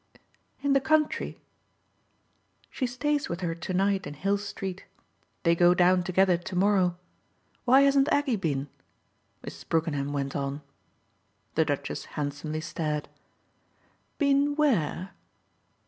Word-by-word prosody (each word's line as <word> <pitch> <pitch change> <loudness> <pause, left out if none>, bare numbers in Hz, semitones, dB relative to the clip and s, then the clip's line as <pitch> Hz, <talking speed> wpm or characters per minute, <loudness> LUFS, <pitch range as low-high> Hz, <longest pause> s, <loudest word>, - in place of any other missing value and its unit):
"In 285 -1 +3
the 275 - +4
country?" 305 +2 +1 1.3
"She 255 - -1
stays 290 +4 -1
with 170 +2 -4
her 170 -2 -1
to 170 +2 -6
night 195 +1 +1
in 145 - -7
Hill 195 +7 0
Street. 195 -2 -6 0.6
They 170 - +4
go 175 +1 +5
down 180 0 +4
together 185 0 +3
to 180 +2 -7
morrow. 185 -2 +2 0.7
Why 260 +2 +6
hasn't 275 +2 +4
Aggie 285 -4 +2
been?" 145 -8 -2 0.8
Mrs. - - -10
Brookenham 150 -4 0
went 140 -1 -3
on. 140 +1 -3 0.9
The 160 - +2
Duchess 145 -2 -3
handsomely 150 +2 -3
stared. 150 -2 -3 1.1
"Been 285 0 +2
where?" 195 - +1
185 Hz, 120 wpm, -27 LUFS, 155-255 Hz, 1.3 s, Why